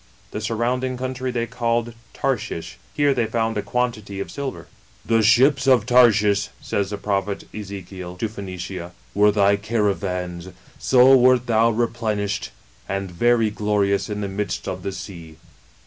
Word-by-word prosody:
The 105 - -4
surrounding 125 +3 -1
country 130 0 -3
they 120 -2 -1
called 120 0 -1 0.2
Tarshish. 115 -10 -3 0.2
Here 145 -1 +3
they 120 -4 0
found 115 -1 -1
a - - 0
quantity 110 -5 -2
of 100 - -5
silver. 140 -2 -5 0.2
" - - -31
The 115 -1 +3
ships 130 +5 +4
of 130 -2 +5
Tarshish," 105 -5 +4
says 100 -1 -2
the 105 - -4
prophet 100 0 -2
Ezekiel, 95 -3 -7
to 110 - -1
Phoenicia, 95 -3 -7 0.2
*"were 105 +1 +4
thy 100 -1 +3
caravans; 95 -4 -2 0.3
so 130 +1 +6
wert 125 -1 +4
thou 115 -1 +3
replenished, 110 -3 -1 0.4
and 100 -1 -3
very 115 +4 +2
glorious 105 -1 0
in 105 0 -3
the 100 - -2
midst 100 +1 -4
of 95 -1 -3
ithe 100 - -3
sea." 95 +1 -7
BEYOND 80 - -12
THE - - -13
GREAT - - -22
SEA. - - -25
105 Hz, 165 wpm, -22 LUFS, 100-120 Hz, 0.4 s, so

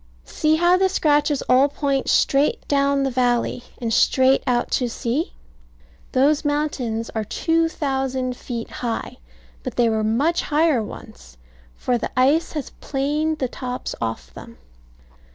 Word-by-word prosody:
See 310 - +1
how 345 +2 +4
the 380 0 +2
scratches 295 -5 +2
all 260 +3 +4
point 275 -1 -1
straight 280 +2 +2
down 280 -1 +2
the 270 - 0
valley, 245 -1 0
and 230 -2 -2
straight 260 +3 +4
out 245 -1 +1
to 250 -2 +1
sea. 245 +7 -2 0.8
Those 285 +3 +3
mountains 280 -7 -2
are 220 - -2
2000 270 - -1
feet 235 -2 -6
high: 235 -2 -4 0.4
but - - -6
they 235 -1 +3
were 220 -1 0
much 270 +11 +1
higher 300 -4 +2
once; 65 - -11 0.4
for 245 -1 -1
the - - -3
ice 285 +6 +3
has 300 -4 -5
planed 300 +3 -1
the 260 - -1
tops 250 0 -5
off 110 - -4
them. - - -12
270 Hz, 140 wpm, -22 LUFS, 240-295 Hz, 0.8 s, how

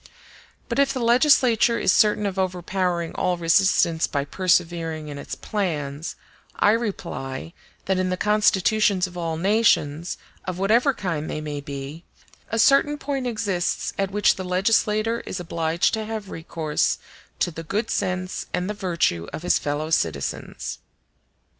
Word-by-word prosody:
But - - -2
if 280 - +4
the 260 - -3
legislature 240 -1 +4
is 185 - +3
certain 210 -1 +3
of 195 -1 -2
overpowering 180 -2 -1
all 180 -1 0
resistance 165 -1 +3
by 140 -1 -2
persevering 165 -2 0
in 145 -1 -6
its - - -6
plans, 155 -7 -3 0.4
I 205 - +4
reply, 170 - -3 0.3
that 190 -1 +1
in 185 0 0
the 185 - -1
constitutions 210 -1 +3
of 180 -1 -10
all 165 -2 -2
nations, 175 -5 +2 0.3
of 185 -2 -4
whatever 235 +8 +3
kind 165 -5 -3
they - - -3
may 150 -1 -5
be, 140 +3 -7 0.5
a 225 - -1
certain 275 +5 +4
point 275 -3 -3
exists 205 -7 -1
at 195 -1 -1
which 205 +1 +2
the 190 - -4
legislator 215 +4 +1
is 185 - -4
obliged 165 -1 0
to 220 -1 -1
have 215 -3 -5
recourse 160 -2 -1 0.4
to 175 - 0
the 165 - -7
good 200 +8 -2
sense 185 -1 -2
and 180 0 -2
the 210 - -2
virtue 170 - 0
of 160 - -6
his 180 - +3
fellow 150 +2 -3
citizens. 80 - -2
185 Hz, 150 wpm, -24 LUFS, 165-210 Hz, 0.5 s, if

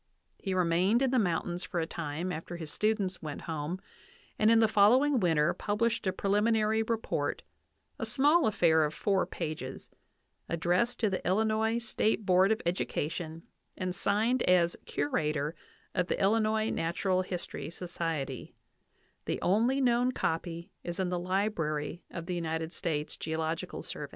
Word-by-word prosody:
He 190 -2 -2
remained 185 +7 +3
in 265 - +2
the 260 - +3
mountains 175 -2 -1
for 175 - -3
a 165 - 0
time 165 +2 -4
after 175 +1 -5
his 160 -3 -7
students 210 -3 0
went 150 -2 -6
home, 160 +2 -4 0.6
and 215 - +5
in 230 0 +6
the 225 - +5
following 245 +7 +5
winter 165 -4 +3
pub 205 0 -2
lished 230 -2 +1
a - - +3
preliminary 215 +3 +2
report, 225 0 -2 0.6
a - - -2
small 295 +3 +4
affair 165 -6 +4
of 150 0 -2
four 195 -2 +1
pages, 155 -3 -5 0.6
ad 170 - -2
dressed 180 +9 +1
to 215 -3 +2
the 185 - -2
Illinois 220 +3 +2
State 220 -2 0
Board 185 +2 +5
of 220 - 0
Education 165 -1 -2 0.3
and 185 -1 -2
signed 215 +6 +1
as 175 -1 +4
curator 150 +1 -1 0.4
of 180 -2 0
the - - -1
Illinois 215 +2 +2
Natural 185 +3 0
History 180 -3 -5
Society; 165 -6 -4 0.7
the - - -2
only 230 +8 +3
known 250 -1 +3
copy 165 -2 -2
is 175 +1 -5
in 185 -1 0
the 180 -1 -1
library 175 -4 -1
of 170 -1 -6
the^ 180 - -3
United 160 -1 -2
States 155 -4 -2
Geological 160 +1 -3
Survey. - - -6
185 Hz, 155 wpm, -30 LUFS, 165-220 Hz, 0.7 s, in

